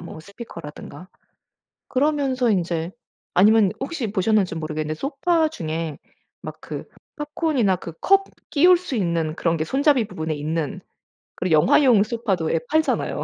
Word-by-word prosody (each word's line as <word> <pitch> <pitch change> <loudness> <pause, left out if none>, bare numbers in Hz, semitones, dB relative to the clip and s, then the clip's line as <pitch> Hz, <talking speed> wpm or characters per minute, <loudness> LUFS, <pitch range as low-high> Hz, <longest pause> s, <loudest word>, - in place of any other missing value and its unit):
뭐 170 -2 -9
스피커라든가. 170 -4 -10 0.8
그러면서 270 -3 +1
인제 170 -4 -1 0.4
아니면 205 +2 +5
혹시 270 -5 -3
보셨는지 200 -2 +1
모르겠는데 155 -1 -3
소파 315 +4 +1
중에 160 - -4 0.4
막 - - -8
그 - - -7 0.3
팝콘이나 295 - 0
그 170 -1 -8
컵 390 0 +4 0.3
끼울 355 +5 +6
수 350 -5 -6
있는 170 -5 -1
그런 165 -1 0
게 155 - -1
손잡이 270 - +2
부분에 160 -5 -4
있는 155 +1 -3 0.6
그리고 180 -3 -1
영화용 230 - +5
소파도 210 -7 -1
예 165 - +2
팔잖아요. 315 +1 0
200 Hz, 315 characters per minute, -22 LUFS, -, 0.8 s, 끼울